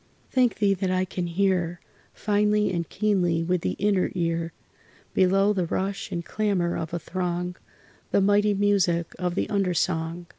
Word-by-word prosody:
Thank 250 -3 +3
Thee 200 -2 +2
that 190 0 -2
I 185 0 +1
can 180 -1 -4
hear, 175 -1 0 0.3
Finely 210 0 +1
and 170 -2 -3
keenly 180 -5 +1
with 180 +1 0
the - - -1
inner 200 -2 +1
ear, 165 -1 -1 0.6
Below 195 +2 +3
the 185 -4 -1
rush 195 +3 -3
and 170 -2 -3
clamor 195 -5 0
of 160 - -4
a 170 - -2
throng 180 +1 -3 0.5
The - - +3
mighty 205 +1 +3
music 195 -4 +1
of 180 -1 -1
the - - 0
under 195 -3 +1
song. 165 +1 -1
185 Hz, 160 wpm, -25 LUFS, 175-200 Hz, 0.6 s, Thank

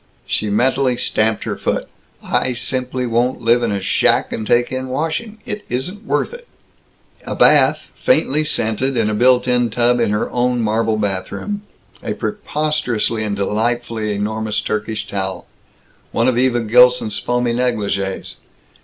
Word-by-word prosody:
She 105 - -1
mentally 130 +3 +2
stamped 110 -3 0
her - - -3
foot. - - -2 0.4
"I 130 - 0
simply 125 +1 -2
won't 120 +2 0
live 120 +1 +4
in 115 -2 0
a 100 - -1
shack 95 - +2
and 110 -1 -4
take 120 0 +2
in 130 0 -3
washing. 160 - -3
It 210 0 -5
isn't 180 - -4
worth - - 0
it." 485 0 -11 0.8
A - - -4
bath, - - +4
faintly 155 - +2
scented, 130 -2 -1
in 110 -2 +1
a - - -1
built 125 +3 +4
in 125 -1 +2
tub 120 +2 +2
in 115 -2 +2
her 105 +1 0
own 125 0 +1
marble 110 0 +1
bathroom. 100 - -3 0.4
A - - -3
preposterously 150 - -1
and 105 -1 -2
delightfully 110 +2 -1
enormous 110 +1 -2
Turkish 110 0 -3
towel. 95 -1 -4 0.7
One - - +1
of 130 - +2
Eva 120 -1 +2
Gilson's 120 -1 +4
foamy 120 -1 0
negligées. 105 -6 -2
120 Hz, 150 wpm, -19 LUFS, 110-130 Hz, 0.8 s, live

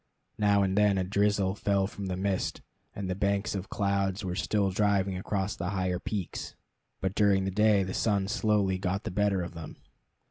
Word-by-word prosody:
Now 100 -1 +4
and 95 0 0
then 105 -1 +4
a 95 - +1
drizzle 100 0 +1
fell 100 -1 +1
from 100 0 -6
the 90 -1 -2
mist, 95 0 -2 0.3
and 100 -2 -4
the 90 - -1
banks 100 +1 0
of 100 -1 -5
clouds 100 0 0
were 90 - -2
still 100 +1 0
driving 100 -1 +1
across 95 +2 -2
the 90 +1 -3
higher 95 -2 -1
peaks, 100 -2 -4 0.5
but 95 0 -1
during 100 -2 +3
the 95 - -1
day 105 0 +4
the 95 0 -4
sun 100 -3 +1
slowly 100 -2 +1
got 95 +1 -2
the - - -4
better 100 -1 +1
of 85 - -7
them. 80 -2 -9
100 Hz, 190 wpm, -29 LUFS, 95-100 Hz, 0.5 s, Now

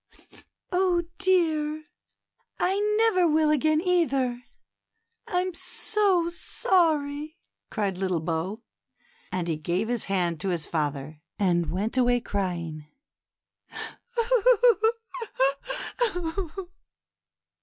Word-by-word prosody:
Oh, 360 -1 +2 0.2
dear! 315 -5 +2 0.8
I 380 +2 +1 0.2
never 435 -6 +4
will 310 -1 +3
again, 310 +1 +3
either; 275 -9 +1 0.9
I'm 365 0 -1
so 385 -1 +2
sorry," 315 -3 0 0.3
cried 200 -5 -2
little 185 -3 0
Bo; 170 +7 -3 0.7
and 180 -2 -2
he 160 -2 -1
gave 175 +8 -1
his 240 -3 -1
hand 175 -4 0
to 195 - -2
his 170 -4 -1
father, 150 -1 -3 0.2
and 175 -5 +1
went 205 +9 -2
away 245 -1 +4
crying. 170 -8 -3
245 Hz, 85 wpm, -26 LUFS, -, 0.9 s, never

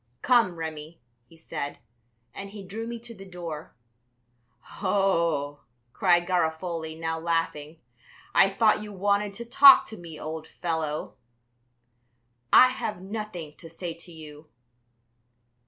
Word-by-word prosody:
"Come, 235 -8 +4
Remi," 160 0 -7 0.3
he 165 - -19
said. 150 -3 -5 0.6
And 195 +7 -7
he 200 0 -9
drew 220 +5 -6
me 235 0 -5
to 235 0 -8
the 195 -3 -12
door. 170 -5 -8 1.1
"Oh," 165 -7 +1 0.3
cried 175 -4 +3
Garofoli, 160 -2 -1
now 160 0 -3
laughing, 165 -2 -2 0.5
"I 195 - +6
thought 215 +2 +3
you 210 0 -8
wanted 200 +1 0
to 235 - -7
talk 275 +3 +8
to 220 - -9
me, 165 -4 -10
old 160 +1 -6
fellow." 160 -3 -3 1.3
"I 255 - +8
have 215 -6 -4
nothing 190 -5 -6
to 165 - -12
say 170 +1 -5
to 170 +2 -14
you." 155 -1 -12
175 Hz, 125 wpm, -27 LUFS, 160-200 Hz, 1.3 s, talk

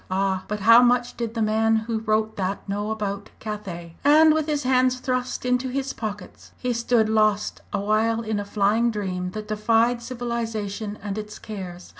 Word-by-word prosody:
"Ah! 190 0 0
but 210 -1 -3
how 230 +4 +8
much 245 0 +2
did 235 -1 -4
the 225 - +1
man 220 +1 +2
who 220 0 -1
wrote 220 0 0
that 195 +1 -3
know 205 +2 -2
about 205 -2 -3
Cathay?" 190 -6 -6
And 310 +2 +6
with 310 -1 0
his 295 -2 -1
hands 255 0 +2
thrust 255 -1 -2
into 250 +1 +1
his 270 +1 -2
pockets, 205 -4 -7
he 250 -1 -1
stood 235 -1 +2
lost 215 -1 +1
awhile 215 +3 +1
in 215 -2 -2
a - - -2
flying 210 +3 +2
dream 185 -4 -3
that 215 -1 -6
defied 225 +3 +2
civilisation 225 -4 -4
and 205 0 -3
its 210 0 -8
cares. 185 -4 -8
220 Hz, 175 wpm, -24 LUFS, 205-240 Hz, -, how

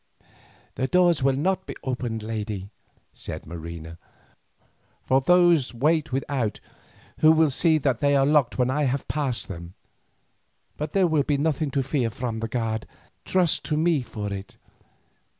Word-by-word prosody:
"The 130 - -1
doors 175 -1 +3
will 135 0 +3
not 185 +7 -1
be - - -6
opened, 120 -4 -3
lady," 105 -3 -4 0.4
said - - -7
Marina, 85 0 -8 1.0
"for 130 +1 +2
those 175 -5 +4
wait 150 +4 +1
without, 130 -4 -2 0.6
who 155 - +7
will 160 -2 +4
see 160 +4 +3
that 135 -5 0
they 140 0 +3
are 135 -1 +4
locked 145 -3 +2
when 125 0 +2
I 150 +2 +1
have 135 +1 -1
passed 140 -5 -2
them. 85 -2 -8 1.0
But 150 0 -5
there 195 -2 +4
will 160 -3 +2
be 145 0 0
nothing 155 0 0
to 135 - +2
fear 130 -3 0
from 120 -1 -4
the 115 - -3
guard, 110 -1 -2 0.4
trust 180 -4 +2
to 150 - -1
me 160 -2 +2
for 105 -4 -5
it. 100 0 -8
135 Hz, 155 wpm, -25 LUFS, 115-155 Hz, 1.0 s, who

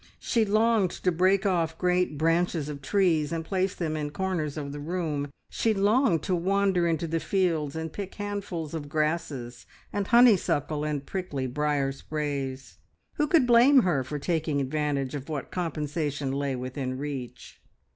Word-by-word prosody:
She 230 -3 +1
longed 215 -1 +3
to 180 - +3
break 185 +4 +2
off 165 -4 +1
great 180 -3 +1
branches 165 -1 +1
of 145 -1 -6
trees, 165 -3 +2
and 165 -1 -3
place 190 +1 0
them 160 -3 -2
in 150 -1 -2
corners 165 -3 -2
of 140 -2 -4
the 145 - -6
room; 155 -2 -2 0.2
she 225 -1 +1
longed 200 - +3
to 185 - 0
wander 190 0 +2
into 165 0 0
the 165 0 -1
fields 165 -6 0
and 160 -1 -4
pick 200 -2 -6
handfuls 200 -6 -4
of 150 -3 -5
grasses, 150 -6 -2 0.3
and 205 -1 -1
honeysuckle, 190 - +4
and 150 -2 -2
prickly 180 -9 -3
briar 140 +1 0
sprays. 140 -2 -4 0.4
Who 300 -1 +2
could 305 -4 +4
blame 245 +2 +6
her 155 -8 +1
for 150 +4 -5
taking 155 -1 -1
advantage 140 -1 -1
of 145 +1 -6
what 150 -3 -4
compensation 150 -4 -2
lay 140 -1 -1
within 130 +1 -4
reach? 135 -3 -7
160 Hz, 160 wpm, -27 LUFS, 145-190 Hz, 0.4 s, blame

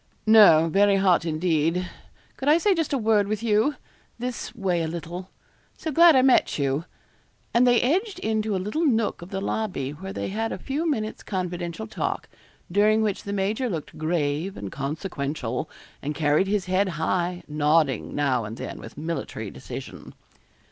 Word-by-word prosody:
'No; 205 -8 +7
very 200 +4 +4
hot, 185 -3 +3
indeed. 165 +2 0 0.5
Could 270 - -1
I 305 - +6
say 395 +4 +3
just 325 -4 -1
a 280 - +2
word 215 -3 +2
with 215 +2 -2
you 225 +6 +2 0.4
this 245 0 -4
way 185 -5 0
a 160 - -1
little. 175 +3 -6 0.5
So 320 - -4
glad 335 +1 +7
I 260 - +5
met 260 -1 +4
you.' 140 +2 0 0.7
And 245 +2 +5
they 245 -1 +5
edged 375 - 0
into 220 - -1
a - - +1
little 210 - -2
nook 225 - +1
of 175 - -9
the 195 - -3
lobby, 190 -9 -2
where 190 +6 -7
they - - -4
had 225 +3 -2
a - - -3
few 305 +5 -2
minutes' 220 -7 -2
confidential 175 - -4
talk, - - -3 0.4
during 215 +3 +4
which 210 -3 -2
the 200 - -4
major 205 +6 -1
looked 165 -7 -5
grave 155 +2 -1
and 100 -2 -6
consequential, 140 - -3 0.3
and 150 +1 -3
carried 150 +5 +2
his 200 -1 0
head 185 +2 +1
high, 175 +2 -1
nodding 150 -3 +1
now 135 -5 +1
and 110 +2 -7
then - - -6
with - - -11
military 150 -9 -4
decision. 65 -2 -9
190 Hz, 170 wpm, -25 LUFS, 155-220 Hz, 0.7 s, No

